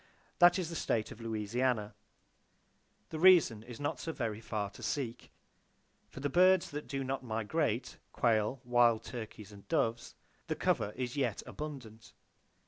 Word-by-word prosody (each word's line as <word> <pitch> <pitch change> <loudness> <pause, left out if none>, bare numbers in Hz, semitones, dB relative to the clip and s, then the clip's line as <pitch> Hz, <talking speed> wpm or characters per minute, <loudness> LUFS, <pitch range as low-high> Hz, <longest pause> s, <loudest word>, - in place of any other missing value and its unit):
That 175 +1 +7
is 175 -3 -3
the - - -5
state 110 -7 -1
of 115 - -10
Louisiana. 110 0 -1 1.2
The 155 - -5
reason 170 - +6
is 120 +1 -10
not 145 - -2
so 165 - -3
very 115 -7 -3
far 105 -3 -3
to - - -13
seek. 125 -5 -3 0.8
For 135 - -10
the 145 - 0
birds 185 +4 +4
that 150 +1 -6
do 135 -1 -3
not 135 0 -3
migrate,—quail, 115 -1 -1
wild 120 -2 +4
turkeys 110 -4 -8
and 100 -1 -14
doves,—the 115 +1 -3
cover 105 - +1
is 125 0 -3
yet 140 - -1
abundant. 120 -7 -8
120 Hz, 140 wpm, -33 LUFS, 110-145 Hz, 1.2 s, That